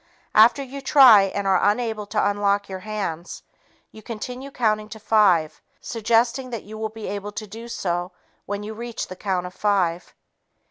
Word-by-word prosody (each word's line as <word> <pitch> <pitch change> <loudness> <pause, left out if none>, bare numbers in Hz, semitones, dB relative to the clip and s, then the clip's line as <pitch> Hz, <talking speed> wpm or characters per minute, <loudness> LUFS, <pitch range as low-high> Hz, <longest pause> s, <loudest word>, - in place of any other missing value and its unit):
After 235 +6 +6
you 275 +1 -8
try 260 -8 +7
and 200 +1 -3
are 190 -2 +3
unable 215 0 0
to 210 0 +1
unlock 200 0 0
your 190 -1 -6
hands, 190 -5 -5 0.5
you 215 - -13
continue 250 +5 -7
counting 215 -5 0
to 220 +1 -9
five, 190 -8 +2 0.2
suggesting 235 +3 0
that 230 -4 -5
you 215 +2 -10
will 220 0 -3
be 220 0 -9
able 205 0 -5
to 215 - -5
do 225 +3 -10
so 175 -5 -3 0.4
when 205 +1 -4
you 215 +1 -6
reach 235 +1 -6
the 185 - -7
count 185 -2 -2
of 180 - -8
five. 185 -5 -1
210 Hz, 175 wpm, -23 LUFS, 195-230 Hz, 0.5 s, try